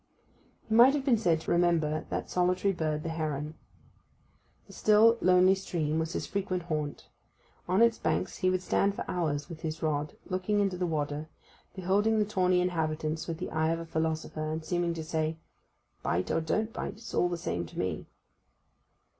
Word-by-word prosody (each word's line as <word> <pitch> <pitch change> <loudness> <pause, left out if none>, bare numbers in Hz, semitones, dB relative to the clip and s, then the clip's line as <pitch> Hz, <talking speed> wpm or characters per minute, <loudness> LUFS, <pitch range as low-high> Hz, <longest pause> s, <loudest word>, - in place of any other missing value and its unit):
He 220 - -2
might 245 +5 +7
have 275 -2 -2
been 240 -6 +4
said 170 -7 +2
to - - -4
resemble 170 -3 +2
that - - -3
solitary 180 +2 +2
bird 155 -3 -2
the 165 - -3
heron. 155 -2 -3 1.1
The - - -15
still, 225 +2 +5
lonely 185 +1 +5
stream 160 -5 -1
was 160 +1 -2
his - - -2
frequent 190 -3 -2
haunt: 155 -4 -4 0.6
on 185 +5 +4
its 230 -1 +3
banks - - -1
he 185 - +2
would 185 0 0
stand 200 +2 +1
for - - -4
hours 150 -5 -1
with 165 -3 -9
his 160 0 -4
rod, 150 -1 -1
looking 185 +2 0
into 195 -2 +1
the 180 0 -1
water, 150 -1 -2 0.5
beholding 200 +4 +2
the 210 - +3
tawny 185 -3 +2
inhabitants 160 -3 -1
with 165 -2 -3
the 180 - -5
eye 160 0 +1
of 165 - +1
a 165 - -6
philosopher, 160 -1 -2
and 160 0 -4
seeming 175 0 0
to 160 - -4
say, 160 0 -1 0.6
'Bite 85 +6 -1
or 165 - +1
don't 215 +8 -1
bite—it's 220 +3 -6
all 175 - +2
the 175 - -2
same 85 - -3
to - - -13
me. - - -2
170 Hz, 180 wpm, -29 LUFS, 155-190 Hz, 1.1 s, might